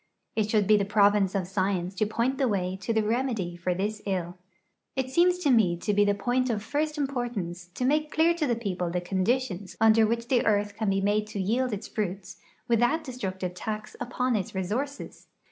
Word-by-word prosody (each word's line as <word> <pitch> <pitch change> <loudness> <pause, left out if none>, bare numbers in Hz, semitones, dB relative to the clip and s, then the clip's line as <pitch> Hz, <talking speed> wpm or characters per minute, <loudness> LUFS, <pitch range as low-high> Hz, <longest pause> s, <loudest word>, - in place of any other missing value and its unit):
It 215 -1 +1
should 210 -3 +2
he 215 0 +6
the 200 - +1
province 205 -1 +3
of 190 -2 0
science 185 -1 -1
to 205 +2 0
point 235 +5 -1
the 270 - +3
way 185 -4 -1
to 190 +4 -3
the 220 -1 +2
remedy 220 -6 -1
for 175 +1 -1
this 210 +3 -2
ill. 180 -2 -2 0.6
It 260 -1 -2
seems 355 +4 +4
to 320 -6 +1
me 200 -8 +4
to 205 +4 -1
he 205 +1 +4
the 205 0 +2
}>oint 250 +4 0
of 210 -3 -1
first 300 +5 -1
importance 240 -11 -3
to 250 - -1
make 300 +3 +2
clear 325 +3 +3
to 325 -3 -1
the 240 - +1
peoi)le 185 -6 -3
the 180 - +1
conditions 190 +1 -1
under 225 0 +5
which 235 +1 -2
the 245 -2 +2
earth 205 -1 +1
can 215 -2 0
he 195 0 +1
made 210 +2 +1
to 215 -1 -5
yield 240 +7 0
its 210 +1 -4
fruits 190 -3 -4 0.3
without 240 +7 +2
destructive 190 - -4
tax 215 +3 -5
upon 250 0 -1
its 195 -2 -3
resources. 240 +10 -4
215 Hz, 205 wpm, -27 LUFS, 190-250 Hz, 0.6 s, he